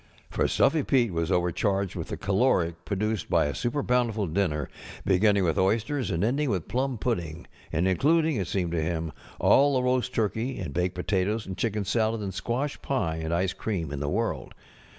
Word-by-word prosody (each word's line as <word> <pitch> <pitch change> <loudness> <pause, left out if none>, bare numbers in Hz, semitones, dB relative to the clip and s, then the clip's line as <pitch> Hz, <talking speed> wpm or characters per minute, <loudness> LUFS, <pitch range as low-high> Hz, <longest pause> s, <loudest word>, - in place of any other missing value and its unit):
For - - +1
Stuffy 155 +2 +3
Pete 120 -7 +2
was 85 +2 -1
overcharged 90 +2 0
with 85 -3 -4
the - - -5
caloric 95 -5 +1
produced 105 0 -2
by - - +3
a 70 - -1
super 125 +4 -1
bountiful 120 -4 +1
dinner, 80 -4 -1 0.4
beginning 100 +1 +3
with 80 -3 +1
oysters 115 +6 +1
and 85 +3 0
ending 135 +6 +1
with 95 -7 -1
plum 130 +4 -1
pudding, 85 -9 -3 0.3
and 85 +4 +1
including 155 - +3
(it 95 - -2
seemed 90 -2 -1
to 85 -1 0
him) 80 0 -2 0.3
all 140 0 +5
the 130 - +1
roast 125 0 +1
turkey 115 +3 -1
and 70 - -5
baked 90 +2 0
potatoes 100 +4 0
and 95 - -5
chicken 105 -1 -1
salad 110 +1 +1
and 95 -2 -4
squash 130 +9 -2
pie 95 -13 -1
and 80 0 -3
ice 90 +2 +1
cream 90 -10 -3
in 70 - -4
the 70 0 -2
world. 95 - -2
100 Hz, 190 wpm, -27 LUFS, 85-120 Hz, 0.4 s, all